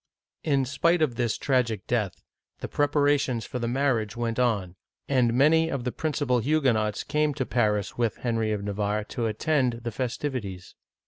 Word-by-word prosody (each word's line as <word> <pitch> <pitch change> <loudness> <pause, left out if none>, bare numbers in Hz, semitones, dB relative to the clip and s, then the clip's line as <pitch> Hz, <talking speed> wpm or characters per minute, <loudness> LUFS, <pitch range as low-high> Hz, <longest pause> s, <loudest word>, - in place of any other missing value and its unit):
In 140 -4 +2
spite 160 +5 +2
of 140 -6 +1
this 120 -2 -1
tragic 120 -7 0
death, 105 -6 -2 0.3
the - - -5
preparations 145 -5 +1
for 125 - -5
the 115 - -2
marriage 120 -4 0
went 115 0 -2
on, 100 -8 0 0.3
and 125 -4 +3
many 155 +6 +4
of 140 -5 -3
the 125 - -2
principal 145 -5 0
Huguenots 120 -6 +1
came 150 -1 0
to 130 - -1
Paris 105 -4 0
with 115 -2 0
Henry 115 -3 -1
of 105 -2 -2
Navarre 105 +1 -1
to 115 -2 -2
attend 125 +1 0
the 120 - -3
festivi 130 +3 -2
ties. 95 -3 -9
120 Hz, 170 wpm, -26 LUFS, 110-140 Hz, 0.3 s, many